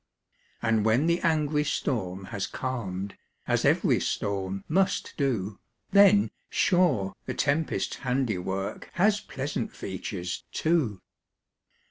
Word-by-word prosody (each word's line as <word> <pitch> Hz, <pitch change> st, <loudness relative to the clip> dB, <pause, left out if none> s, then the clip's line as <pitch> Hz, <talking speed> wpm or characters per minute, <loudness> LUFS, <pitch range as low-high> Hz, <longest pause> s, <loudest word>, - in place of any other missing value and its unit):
And 110 Hz, -1 st, +2 dB
when 110 Hz, +7 st, +3 dB
the 170 Hz, +1 st, +2 dB
angry 155 Hz, -3 st, +2 dB
storm 100 Hz, -10 st, -2 dB
has 100 Hz, -, -2 dB
calm'd, 100 Hz, -7 st, -4 dB, 0.3 s
As -, -, +2 dB
ev'ry -, -, +3 dB
storm 95 Hz, -1 st, -2 dB
must 190 Hz, +4 st, +1 dB
do, 110 Hz, -8 st, -1 dB, 0.3 s
Then, 200 Hz, 0 st, +6 dB, 0.2 s
sure, 165 Hz, -, +2 dB
the -, -, -3 dB
tempest's 150 Hz, +2 st, 0 dB
handiwork, 105 Hz, -7 st, -2 dB
Has 205 Hz, +3 st, +3 dB
pleasant 135 Hz, -2 st, -4 dB
features, 90 Hz, -2 st, -5 dB
too. 135 Hz, -, 0 dB
125 Hz, 105 wpm, -27 LUFS, 95-160 Hz, 0.3 s, Then